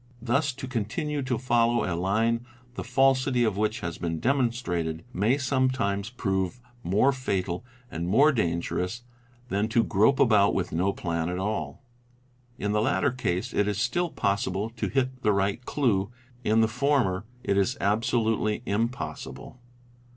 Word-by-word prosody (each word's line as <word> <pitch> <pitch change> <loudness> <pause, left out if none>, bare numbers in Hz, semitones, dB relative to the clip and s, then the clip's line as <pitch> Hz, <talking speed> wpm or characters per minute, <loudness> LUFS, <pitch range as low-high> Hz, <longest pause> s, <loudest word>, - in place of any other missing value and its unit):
Thus 130 +5 +1
to 130 0 -7
continue 130 +5 -2
to 130 -2 -1
follow 120 -1 +2
a 95 - -1
line 110 +6 +1 0.3
the - - -5
falsity 135 -2 +3
of 110 -4 +1
which 105 +1 -1
has 85 -2 -4
been 80 -2 -2
demonstrated, 115 - -1
may 115 +7 +2
sometimes 130 -7 0
prove 95 -3 -2 0.2
more 110 +8 +3
fatal 95 -8 -2 0.3
and 85 +2 -3
more 140 +11 +5
dangerous 90 - -1 0.5
than 100 +1 0
to 115 +1 +2
grope 110 +8 +3
about 105 -4 +4
with 90 -2 -1
no 90 +4 +1
plan 85 -3 -2
at 90 - -3
all: 105 +7 -3 0.7
in 105 -3 -2
the 105 0 +2
latter 135 +5 +2
case 95 -8 -2
it 105 - +2
is 105 -1 -1
still 150 +10 0
possible 100 - -1
to 115 - -3
hit 130 -1 -1
the 105 - +3
right 100 +4 0
clue, 105 -9 +1 0.3
in 110 0 +3
the 110 - +4
former 115 -5 +1 0.2
it 100 - +1
is 100 +7 +1
absolutely 110 +1 +1
impossible. 115 +3 -4
110 Hz, 150 wpm, -27 LUFS, 95-125 Hz, 0.7 s, more